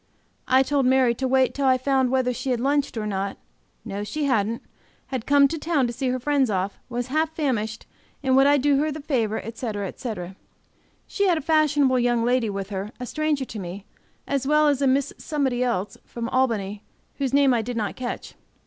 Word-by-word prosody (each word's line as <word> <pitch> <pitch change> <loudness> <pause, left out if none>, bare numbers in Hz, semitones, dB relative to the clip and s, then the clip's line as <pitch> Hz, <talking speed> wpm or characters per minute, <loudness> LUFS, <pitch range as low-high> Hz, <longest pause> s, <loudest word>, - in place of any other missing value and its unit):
I 260 +1 +5
told 275 -1 +1
Mary 260 -2 +4
to 260 +3 -2
wait 260 0 +3
till 280 -1 0
I 260 -1 +5
found 265 0 +1
whether 255 -1 +1
she 265 - -4
had 245 -2 +1
lunched 280 0 0
or 215 - -2
not; 195 -1 -2 0.5
no, 205 -2 -4
she 300 +8 -3
hadn't; 230 -4 0 0.5
had 250 -4 -3
come 285 0 +6
to 325 - -4
town 300 -4 +1
to 240 - -3
see 255 +1 -1
friends 275 0 +1
off, 195 0 -2
was 245 0 -3
half 315 +3 0
famished, 225 -8 -2 0.4
and 260 -1 +3
would 270 +1 +6
I 290 0 +5
do 280 0 +3
her 305 +1 0
the 305 - -6
favor, 230 -7 0
etc., 220 -3 -4
etc. 190 -5 -6 0.7
She 400 -1 0
had 350 -3 +3
a - - -2
fashionable 295 -4 +3
young 240 -1 +2
lady 245 -2 +2
with 200 0 -5
her, 195 +2 -4
a 250 - -4
stranger 305 0 -1
to 220 - -7
me, 190 +2 -7 0.4
as 275 -1 -1
well 300 +1 +4
as 285 -1 0
a 275 - +3
Miss 270 +1 +1
Somebody 265 -5 -1
else, 210 -5 -2
from 235 -1 -5
Albany, 210 -6 0 0.4
whose 270 -2 0
name 275 -1 +4
I 235 - +2
did 240 +2 -5
not 210 -2 -2
catch. 250 -1 -5
255 Hz, 205 wpm, -24 LUFS, 225-280 Hz, 0.7 s, come